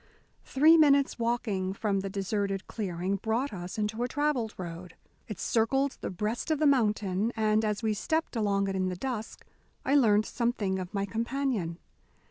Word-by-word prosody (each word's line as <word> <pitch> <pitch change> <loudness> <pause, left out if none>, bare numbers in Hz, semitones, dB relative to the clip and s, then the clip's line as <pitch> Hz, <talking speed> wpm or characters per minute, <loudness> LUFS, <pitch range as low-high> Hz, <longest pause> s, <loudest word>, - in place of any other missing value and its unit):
Three 310 +5 +6
minutes' 280 -4 +4
walking 220 -5 -1
from 200 -1 0
the 195 0 -3
deserted 195 0 -2
clearing 190 -2 -2
brought 230 +5 -1
us 180 +1 -6
into 215 +2 -2
a 245 - +1
travelled 265 -5 -1
road. 175 -1 -7 0.3
It 215 -6 -6
circled 270 +5 +1
the - - -3
breast 210 - -3
of 315 - +2
the 305 - +1
mountain, 215 -6 +2
and 215 -1 +2
as 210 +1 -1
we 220 -1 +2
stepped 315 +8 -1
along 200 -3 +1
it 195 - -2
in 185 -1 0
the 180 - -3
dusk 230 +1 -5 0.4
I 270 - +1
learned 215 -7 +4
something 220 -6 -1
of 185 -1 -6
my 200 -1 -1
companion. 225 -5 -2
215 Hz, 170 wpm, -29 LUFS, 195-245 Hz, 0.4 s, Three